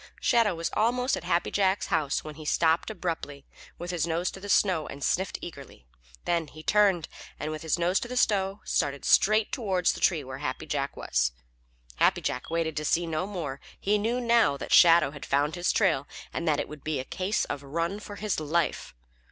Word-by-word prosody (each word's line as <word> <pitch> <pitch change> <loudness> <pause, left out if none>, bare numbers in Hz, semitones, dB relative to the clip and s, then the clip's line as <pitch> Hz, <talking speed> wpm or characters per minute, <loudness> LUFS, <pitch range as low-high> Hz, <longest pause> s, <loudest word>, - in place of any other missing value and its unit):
Shadow 225 -6 +3
was 165 0 -3
almost 250 +4 +1
at - - -7
Happy 175 0 0
Jack's 195 -1 +1
house 145 -3 0
when 155 - -7
he 155 +1 -10
stopped 160 +4 +2
abruptly 165 -8 -5 0.3
with 175 +1 -5
his 170 -2 -1
nose 170 +2 -1
to - - -10
the 205 +1 -8
snow 185 -5 +2
and 140 0 -8
sniffed 190 +2 0
eagerly. 140 - -10 0.4
Then 170 -2 0
he 155 +2 -12
turned, 195 -5 +3 0.3
and 150 - -3
with 155 -1 -5
his 160 +1 0
nose 175 +3 +2
to - - -5
the 250 +1 -5
snow, 195 -3 +1
started 140 -3 -1
straight 215 +1 +4
toward 190 -7 -1
the - - +3
tree 165 -5 +2
where 130 0 -8
Happy 145 - -4
Jack - - -3
was. 60 -1 0 0.6
Happy - - +3
Jack 125 - -3
waited 165 -1 -1
to 150 - -1
see 170 +3 +1
no 165 +3 -2
more. 160 -9 -5 0.2
He 205 +1 +1
knew 230 +4 0
now 235 - +3
that - - -4
Shadow 170 -4 +7
had 145 -1 -10
found 145 +3 +1
his 175 0 0
trail 135 +2 +1 0.3
and 170 - -3
that 150 -2 +2
it - - -2
was 150 - -9
to - - -31
be 155 -3 -2
a 130 - -4
case 190 +8 -1
of 145 - -5
run 165 +7 -2
for 205 -1 -9
his 210 -4 -2
life. 155 - -1
170 Hz, 210 wpm, -27 LUFS, 150-195 Hz, 0.6 s, Shadow